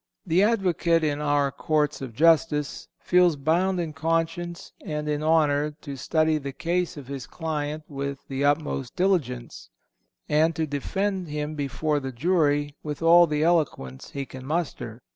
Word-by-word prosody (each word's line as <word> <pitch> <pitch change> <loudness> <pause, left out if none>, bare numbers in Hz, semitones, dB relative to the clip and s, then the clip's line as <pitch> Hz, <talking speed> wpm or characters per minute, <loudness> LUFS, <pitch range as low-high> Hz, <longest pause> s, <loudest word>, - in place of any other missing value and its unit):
The 175 +1 +3
advocate 180 -6 +2
in 150 -1 0
our 145 -1 +2
courts 150 +1 0
of 125 -4 -7
justice 155 -1 +2
feels 180 -2 +4
bound 175 +6 +1
in 165 -3 -3
conscience 165 +2 -2
and 150 -1 -4
in 150 0 -1
honor 150 -2 +2
to 140 - -6
study 155 +3 +1
the 140 -1 -5
case 170 +3 -2
of 145 - -8
his 135 -2 -6
client 155 -2 -3
with 140 -1 -5
the 135 +1 -2
utmost 145 -3 0
diligence, 125 - -1 0.6
and 160 +2 +2
to 160 - 0
defend 185 +6 -2
him 150 0 -3
before 145 +1 -1
the 135 -1 -5
jury 145 0 +1
with 150 +1 -5
all 170 +1 +7
the 150 0 0
eloquence 150 - 0
he 140 -1 -5
can 130 0 -10
master. 140 -8 -3
150 Hz, 155 wpm, -25 LUFS, 140-165 Hz, 0.6 s, all